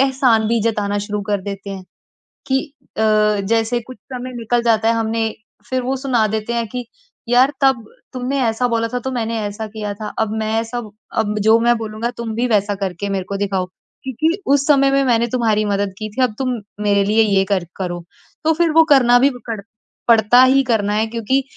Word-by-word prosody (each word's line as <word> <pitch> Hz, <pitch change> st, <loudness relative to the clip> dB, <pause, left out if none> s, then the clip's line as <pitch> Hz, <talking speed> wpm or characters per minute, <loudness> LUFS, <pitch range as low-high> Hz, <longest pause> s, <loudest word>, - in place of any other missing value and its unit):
एहसान 260 Hz, -5 st, +3 dB
भी 230 Hz, -1 st, +1 dB
जताना 210 Hz, -3 st, 0 dB
शुरू 205 Hz, 0 st, -3 dB
कर 205 Hz, -1 st, -1 dB
देते 200 Hz, 0 st, -6 dB
हैं, 195 Hz, -1 st, -6 dB, 0.7 s
कि 265 Hz, 0 st, +2 dB, 0.4 s
अ, -, -, 0 dB, 0.4 s
जैसे 225 Hz, +3 st, +1 dB
कुछ 255 Hz, 0 st, -12 dB, 0.2 s
समय 255 Hz, 0 st, -5 dB
निकल 235 Hz, +1 st, 0 dB
जाता 225 Hz, -1 st, +2 dB
है, 230 Hz, -, +3 dB
हमने 225 Hz, 0 st, 0 dB, 0.4 s
फिर 260 Hz, -1 st, 0 dB
वो 265 Hz, +2 st, -1 dB
सुना 255 Hz, -5 st, +1 dB
देते 220 Hz, +2 st, -3 dB
हैं 235 Hz, -1 st, -1 dB
कि 245 Hz, +2 st, -5 dB, 0.4 s
यार 255 Hz, +3 st, +5 dB
तब 265 Hz, -4 st, +3 dB, 0.3 s
तुमने 260 Hz, +2 st, -2 dB
ऐसा 230 Hz, +2 st, +1 dB
बोला 230 Hz, -1 st, 0 dB
था 250 Hz, -, 0 dB
तो 265 Hz, +2 st, -4 dB
मैंने 230 Hz, -2 st, -2 dB
ऐसा 215 Hz, +2 st, -6 dB
किया 210 Hz, -1 st, -5 dB
था। 210 Hz, 0 st, -7 dB
अब 220 Hz, -1 st, 0 dB
मैं 220 Hz, 0 st, -2 dB
ऐसा 230 Hz, +2 st, -4 dB, 0.4 s
अब 210 Hz, -1 st, 0 dB
जो 220 Hz, +1 st, +5 dB
मैं 240 Hz, +1 st, +3 dB
बोलूँगा 225 Hz, +2 st, -4 dB
तुम 230 Hz, -2 st, -4 dB
भी 245 Hz, +2 st, 0 dB
वैसा 205 Hz, -2 st, +1 dB
करके 195 Hz, 0 st, -4 dB
मेरे 190 Hz, -2 st, -2 dB
को 200 Hz, -, -2 dB
दिखाओ, 195 Hz, -2 st, -1 dB, 0.4 s
क्योंकि 315 Hz, -, -1 dB
उस 280 Hz, 0 st, +3 dB
समय 275 Hz, -2 st, +4 dB
में 275 Hz, 0 st, +3 dB
मैंने 235 Hz, -1 st, +2 dB
तुम्हारी 220 Hz, -3 st, +1 dB
मदद 200 Hz, -1 st, -1 dB
की 215 Hz, 0 st, -4 dB
थी, 250 Hz, +5 st, -3 dB
अब 215 Hz, -4 st, 0 dB
तुम 255 Hz, -2 st, -1 dB, 0.3 s
मेरे 200 Hz, -1 st, +3 dB
लिए 220 Hz, +2 st, +3 dB
ये 195 Hz, -2 st, +2 dB
कर 185 Hz, -3 st, 0 dB
करो। 175 Hz, -2 st, -4 dB, 0.4 s
तो 320 Hz, -, +4 dB
फिर 335 Hz, 0 st, +1 dB
वो 325 Hz, +1 st, +6 dB
करना 245 Hz, -2 st, +5 dB
भी 275 Hz, +3 st, +5 dB, 0.2 s
कड़ 225 Hz, -3 st, -3 dB, 0.5 s
पड़ता 230 Hz, +3 st, +6 dB
ही 270 Hz, +1 st, +4 dB
करना 215 Hz, -5 st, 0 dB
है, 220 Hz, +1 st, +1 dB
क्योंकि 235 Hz, +4 st, 0 dB
225 Hz, 205 wpm, -19 LUFS, 210-250 Hz, 0.7 s, वो